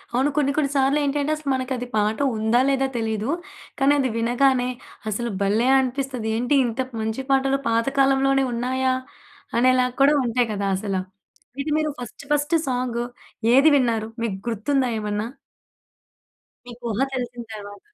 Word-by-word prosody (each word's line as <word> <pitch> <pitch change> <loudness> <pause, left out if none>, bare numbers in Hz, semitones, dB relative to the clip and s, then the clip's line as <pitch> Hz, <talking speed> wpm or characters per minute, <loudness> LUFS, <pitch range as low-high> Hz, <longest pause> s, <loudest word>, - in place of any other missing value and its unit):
అవును. 265 +4 +3
కొన్ని 280 -2 +3
కొన్ని 300 -3 +1
సార్లేంటంటే 285 +1 +1
అసలు 305 -2 -5
మనకది 255 -1 -2
పాట 215 +1 +1 0.2
ఉందా 220 +3 +2
లేదా 270 -1 +2
తెలీదు. 220 0 -2 0.5
కానీ 275 +1 +4
అది 265 -2 +1
వినగానే 245 +2 +2 0.4
అసలు 235 +3 -2
భలే! 210 +5 +2
అనిపిస్తది. 260 -2 -2
ఏంటి? 250 +5 +1
ఇంత 235 +2 -2 0.2
మంచి 220 +4 -2
పాటలు 270 0 +3
పాత 230 0 +2
కాలంలోనే 270 0 +3
ఉన్నాయా? 255 +2 0 0.6
అనేలాగా 250 0 +3
కూడా 280 +2 +6
ఉంటాయి 240 0 +1
కదా! 200 -1 -2
అసల. 195 0 -3 0.7
ఇది 300 +2 -3
మీరు 310 0 0
ఫస్ట్ 245 +2 -8
ఫస్ట్ 295 +2 +2
సాంగ్ 245 -2 -1 0.5
ఏది 275 +5 +7
విన్నారు? 230 -4 +1 0.2
మీకు 205 -5 -2
గుర్తుందా 250 +4 0
ఏమన్నా? 210 0 -2 1.4
మీకు 245 0 -11
ఊహ 210 - -3
తెలిసిన 245 -2 -4
తర్వాత. 205 -1 -9
250 Hz, 140 wpm, -23 LUFS, 230-270 Hz, 1.4 s, ఏది